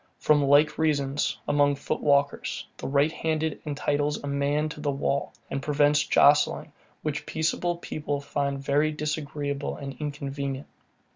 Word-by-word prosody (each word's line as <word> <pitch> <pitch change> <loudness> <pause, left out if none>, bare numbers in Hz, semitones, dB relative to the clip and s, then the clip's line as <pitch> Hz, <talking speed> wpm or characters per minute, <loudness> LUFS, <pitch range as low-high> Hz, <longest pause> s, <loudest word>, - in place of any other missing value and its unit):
From 150 -1 +3
like 145 +3 +4
reasons, 145 -3 +1
among 145 -1 +3
foot 140 - -3
walkers, 140 -1 +1
the - - -5
right 140 +3 +3
hand 160 -1 -1 0.2
entitles 145 0 0
a - - -9
man 140 +2 0
to 150 - -9
the 145 - -1
wall, 140 0 -1 0.2
and 135 - -2
prevents 150 +1 +3
jostling, 145 -1 +4 0.3
which 150 -2 -3
peaceable 170 +2 0
people 145 -4 -3
find 140 0 -2
very 145 +3 +1
disagreeable 150 -1 -3
and 135 -2 -6
inconvenient. 140 -2 -4
145 Hz, 140 wpm, -26 LUFS, 140-150 Hz, 0.3 s, like